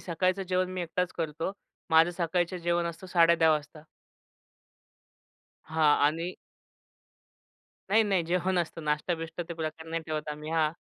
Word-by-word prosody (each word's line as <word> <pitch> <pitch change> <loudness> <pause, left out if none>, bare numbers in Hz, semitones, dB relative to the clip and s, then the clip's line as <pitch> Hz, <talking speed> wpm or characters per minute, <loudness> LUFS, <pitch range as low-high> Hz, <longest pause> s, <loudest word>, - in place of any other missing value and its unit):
सकाळचं 185 +2 0
जेवण 185 0 +1
मी 185 -1 -2
एकटाच 175 +2 -2
करतो. 165 +2 -3 0.4
माझं 160 +2 +6
सकाळचं 175 +1 0
जेवण 170 0 0
असतं 170 +2 -6
10:30 170 -2 +5
वाजता. 150 0 -2 1.8
हां. 155 -2 +3
आणि 165 +4 -1 1.6
नाही, 220 +2 +6
नाही. 195 -4 +1
जेवण 180 +2 +1
असतं 165 -1 -3
नाश्ता-बिष्टा 160 +3 -2
ते 170 - -4
प्रकार 160 0 -5
नाही 165 0 -2
ठेवत 155 -1 -3
आम्ही. 150 +1 -7
हां. 160 -2 +2
165 Hz, 135 wpm, -29 LUFS, 160-180 Hz, 1.8 s, माझं